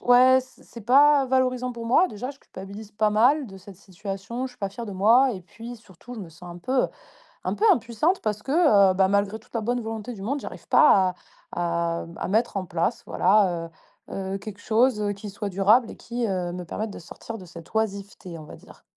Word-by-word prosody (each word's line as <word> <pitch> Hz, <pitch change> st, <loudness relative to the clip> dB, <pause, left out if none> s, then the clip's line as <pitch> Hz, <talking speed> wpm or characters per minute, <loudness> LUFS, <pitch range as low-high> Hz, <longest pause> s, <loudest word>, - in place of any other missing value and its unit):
ouais, 255 Hz, +1 st, +6 dB
c 255 Hz, 0 st, -18 dB
c'est 235 Hz, -, -11 dB
pas 280 Hz, +4 st, +5 dB
valorisant 255 Hz, -1 st, 0 dB
pour 235 Hz, -1 st, -7 dB
moi, 260 Hz, +10 st, +4 dB
déjà, 245 Hz, +5 st, -6 dB
je 280 Hz, -, -14 dB
culpabilise 200 Hz, +1 st, -10 dB
pas 215 Hz, 0 st, +1 dB
mal 255 Hz, +7 st, +3 dB
de 195 Hz, -, -11 dB
cette 195 Hz, +1 st, -13 dB
situation. 200 Hz, +6 st, -6 dB
Je -, -, -10 dB
suis -, -, -25 dB
pas 200 Hz, -, -2 dB
fière 230 Hz, +4 st, -8 dB
de 205 Hz, -, -6 dB
moi 235 Hz, +7 st, +4 dB
et 190 Hz, -, -6 dB
puis 230 Hz, +6 st, -10 dB
surtout, 220 Hz, +2 st, -13 dB
je 220 Hz, -, -7 dB
me 175 Hz, -, -8 dB
sens 165 Hz, +2 st, -15 dB
un -, -, -10 dB
peu, 255 Hz, +9 st, +1 dB
heu, -, -, -2 dB, 0.6 s
un -, -, 0 dB
peu -, -, -4 dB
impuissante 300 Hz, -, +1 dB
parce 210 Hz, -1 st, -2 dB
que, 270 Hz, -, -4 dB, 0.4 s
heu, -, -, -1 dB
bah, 190 Hz, 0 st, +4 dB
malgré 200 Hz, +2 st, 0 dB
toute 220 Hz, -, -26 dB
la 230 Hz, -, 0 dB
bonne 245 Hz, +3 st, -1 dB
volonté 225 Hz, +1 st, -5 dB
du 200 Hz, -, -10 dB
monde, 275 Hz, +8 st, -2 dB
j'arrive -, -, -9 dB
pas 190 Hz, -11 st, +5 dB, 0.4 s
à 170 Hz, -1 st, -1 dB
à -, -, -6 dB
m 170 Hz, -, -11 dB
à -, -, -3 dB
mettre 220 Hz, +2 st, +1 dB
en 190 Hz, -, -3 dB
place, 165 Hz, -1 st, -2 dB
voilà, 180 Hz, -4 st, +2 dB, 0.4 s
heu 190 Hz, 0 st, -4 dB
heu, -, -, -2 dB
quelque 205 Hz, 0 st, -9 dB
chose, 230 Hz, +2 st, +2 dB
heu, 205 Hz, -1 st, 0 dB
qui 205 Hz, +1 st, -8 dB
soit 205 Hz, +1 st, -5 dB
durable 210 Hz, +5 st, +3 dB
et -, -, -9 dB
qui, 235 Hz, 0 st, -4 dB
heu, 180 Hz, -3 st, -2 dB
me 180 Hz, 0 st, -6 dB
permette 215 Hz, +5 st, -4 dB
de -, -, -9 dB
sortir 225 Hz, +6 st, -9 dB
de 185 Hz, -, -11 dB
cette 170 Hz, +3 st, -13 dB
oisiveté, 200 Hz, -5 st, -3 dB
on 155 Hz, -, -10 dB
va 150 Hz, -, -11 dB
dire. -, -, -18 dB
210 Hz, 235 wpm, -25 LUFS, 190-245 Hz, 0.6 s, ouais